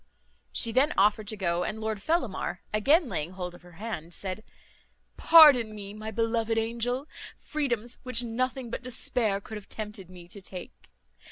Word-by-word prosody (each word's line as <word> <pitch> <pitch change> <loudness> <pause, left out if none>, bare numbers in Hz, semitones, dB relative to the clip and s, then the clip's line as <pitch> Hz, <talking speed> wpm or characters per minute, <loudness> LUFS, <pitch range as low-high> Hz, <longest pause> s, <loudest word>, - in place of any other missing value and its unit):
She 230 - +2
then 270 +6 +3
offered 210 +1 +3
to 215 - -2
go; 175 -2 0
and 220 - -3
Lord 220 -2 -3
Fellamar, 255 - -1
again 285 - +4
laying 165 -5 -3
hold 180 -1 -5
of 175 - -14
her 175 0 -16
hand, 175 -4 -6
said, 195 +2 -5 0.7
"Pardon 275 -10 +7
me, 200 -1 -8
my 215 +1 -6
beloved 225 0 0
angel, 235 +4 -1 0.3
freedoms 245 -6 -3
which 255 -2 +2
nothing 245 +1 -2
but - - -4
despair 235 -4 0
could 215 +2 -8
have 205 - -12
tempted 210 -4 -6
me 180 -2 -12
to 200 - -8
take. 185 -1 -9
220 Hz, 165 wpm, -28 LUFS, 195-245 Hz, 0.7 s, Pardon